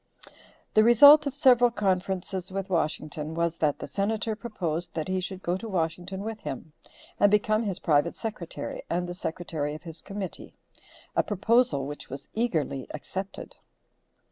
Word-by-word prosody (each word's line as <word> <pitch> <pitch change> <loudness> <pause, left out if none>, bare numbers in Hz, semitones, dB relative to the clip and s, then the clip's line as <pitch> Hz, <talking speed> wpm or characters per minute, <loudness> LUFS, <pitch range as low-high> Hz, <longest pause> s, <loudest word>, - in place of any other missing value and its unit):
The 215 - +6
result 285 +6 +8
of 275 - -3
several 245 -4 +6
conferences 190 -3 -1
with 195 0 -4
Washington 155 -2 -2
was 170 0 0
that 150 -2 +1
the - - -6
Senator 210 +7 -1
proposed 180 -7 -4
that 160 -2 -2
he 185 0 0
should 190 +1 -6
go 175 - 0
to 225 +3 -7
Washington 180 +1 -2
with 220 0 -5
him 150 0 -7 0.5
and 205 - +6
become 215 +1 +3
his 200 -5 -2
private 145 -3 +1
secretary 210 -7 -5
and 175 +1 -1
the 175 - -4
secretary 160 -4 -3
of 155 - -10
his 165 -2 -9
committee; 195 -2 -6 0.6
a - - +5
proposal 225 - +2
which 145 +1 -7
was 135 +1 -8
eagerly 155 - -1
accepted. 190 +6 -7
185 Hz, 155 wpm, -27 LUFS, 160-215 Hz, 0.6 s, result